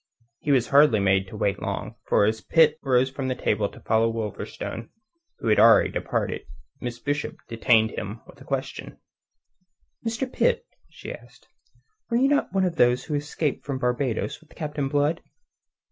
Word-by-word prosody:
He - - -5
was 125 -4 +3
hardly 140 -6 +6
made 95 -1 +2
to 105 - -9
wait 100 -2 0
so - - -15
long, - - -4
for - - +4
as 110 +1 0
Pitt 155 +2 +4
rose 130 -1 +2
from 135 -1 -3
table 105 -5 0
to - - -14
follow 110 +1 +2
Wolverstone, 115 +1 -5 0.5
who - - -5
had 105 - +4
already 115 +1 +6
departed, - - -2 0.4
Miss 120 -1 -5
Bishop 145 +3 -3
detained 115 -1 +3
him 105 +2 -6
with 140 - -17
a - - -10
question: 135 0 -4 1.1
"Mr. 230 +3 -1
Pitt," 485 -1 +1 0.2
she - - -8
asked, - - -15 0.6
"were 235 - +2
you 265 +3 +4
not 285 0 +1
one 195 -1 +2
of 170 -3 -2
those 125 -1 +4
who 155 - -5
escaped 145 0 -2
from 140 -2 -3
Barbados 125 +2 -1
with 160 - -21
Captain 150 -3 -3
Blood?" 145 +3 +1
130 Hz, 170 wpm, -25 LUFS, 115-150 Hz, 1.1 s, hardly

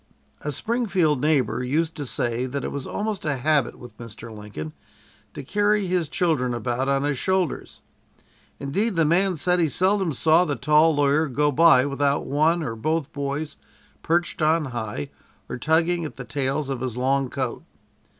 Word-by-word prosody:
A 150 - -3
Springfield 185 - 0
neighbor 140 -5 +1
used 160 +6 0
to 145 -3 -4
say 120 +1 -1
that 140 +1 -4
it - - -3
was 140 -2 -5
almost 210 -1 -3
a 145 -3 -1
habit 145 -1 +1
with 120 -3 -12
Mr. 115 -1 -9
Lincoln 100 -8 -7 0.6
to 145 - -6
carry 205 +5 +1
his 180 -4 0
children 140 -10 0
about 120 +3 -1
on 140 0 +1
his 145 -3 -1
shoulders. 190 -4 -1 0.8
Indeed, 195 +10 -1
the 165 -1 +3
man 180 +4 +2
said 180 +4 +1
he 165 -3 +2
seldom 190 +2 +1
saw 160 +5 +4
the 150 -5 -1
tall 150 +2 +4
lawyer 145 +2 +2
go 145 +2 +1
by 150 -3 +6
without 140 0 0
one 155 +4 +2
or 115 -6 -3
both 155 +6 -2
boys 140 +1 -4 0.4
perched 170 +2 0
on 155 +1 +3
high 105 -11 -4 0.4
or - - -6
tugging 165 +4 +2
at 155 - -6
the 130 - -7
tails 140 +1 -2
of 130 -3 -4
his 125 -2 -3
long 135 +1 +1
coat. 130 -3 -3
145 Hz, 170 wpm, -24 LUFS, 130-165 Hz, 0.8 s, by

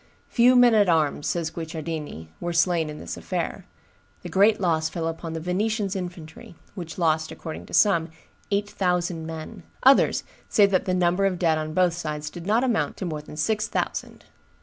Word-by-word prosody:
"Few 245 +1 +5
men 245 -1 +6
at 205 -4 +4
arms," 155 -3 +1
says 165 -2 -1
Guicciardini, 160 - -6
"were 175 0 -3
slain 170 -2 +2
in 150 - -7
this 85 - -6
affair; - - -4 0.6
the - - -6
great 210 +3 +4
loss 160 -4 +1
fell 165 0 -3
upon 165 0 -5
the 165 - -3
Venetians' 200 +4 -1
infantry, 175 -3 -7 0.2
which 170 -3 -7
lost, 160 -2 +1
according 160 -2 -8
to - - -13
some, 170 -6 +4 0.4
eight 200 0 0
thousand 180 -4 -1
men; 165 +6 -7 0.2
others 270 +1 +5 0.3
say 205 - +5
that 195 -2 +1
the 185 - 0
number 180 +2 +2
of 185 -2 -2
dead 165 -3 +2
on 155 0 -5
both 180 -2 +3
sides 150 -3 -4
did 175 0 -9
not 225 +4 +3
amount 240 -4 0
to 190 - -4
more 155 -3 -4
than 150 0 -12
six 215 +6 0
thousand." - - -4
175 Hz, 185 wpm, -25 LUFS, 160-195 Hz, 0.6 s, men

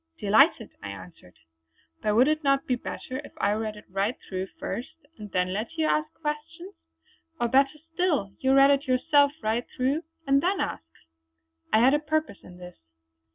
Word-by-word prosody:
"Delighted!" 225 +3 +3
I 100 - -6
answered, 100 - -12 0.7
"But 210 -1 +1
would 250 +4 +5
it 310 +1 0
not 275 -1 +2
be 255 - 0
better 255 +1 -5
if - - -13
I 200 - +1
read 215 0 -2
it 210 - -13
right 195 +6 -1
through 185 0 -4
first, 240 - -4 0.3
and 210 -1 -8
then 185 -1 0
let 215 +9 -4
you 320 - +1
ask 305 0 +1
questions! 325 +5 -5 0.7
Or 240 - +1
better 275 +4 +3 0.2
still 310 - 0
you 265 0 +3
read 275 +1 +7
it 280 +1 +1
yourself 285 +2 +4
right 225 +3 -1
through, 270 +5 +1 0.2
and 275 0 +3
then 370 +3 0
ask." 80 - -3 0.8
I 220 - +5
had 260 +3 +5
a 295 - +3
purpose 310 -6 -2
in 180 0 -13
this. 180 0 -12
260 Hz, 180 wpm, -26 LUFS, 210-300 Hz, 0.8 s, read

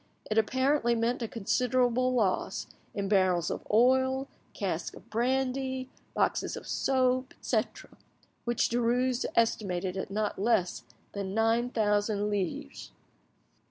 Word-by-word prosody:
It 215 - +4
apparently 260 +2 +2
meant 235 +2 0
a 230 - -1
considerable 250 +3 +1
loss 205 -6 0 0.3
in 200 -1 -1
barrels 185 -4 +2
of - - -5
oil, 260 +4 +3 0.2
casks - - -3
of - - -17
brandy, 260 +2 -1 0.2
boxes - - 0
of - - -9
soap, 255 0 +1
etc., - - -2 0.5
which 240 -1 +1
Derues 245 +1 +1
estimated 190 -5 +1
at 190 - -4
not 210 0 -2
less 185 - +1 0.3
than 200 -1 -4
nine 225 +2 +2
thousand 210 -2 +1
livres. 180 - -3
230 Hz, 120 wpm, -29 LUFS, 205-255 Hz, 0.5 s, It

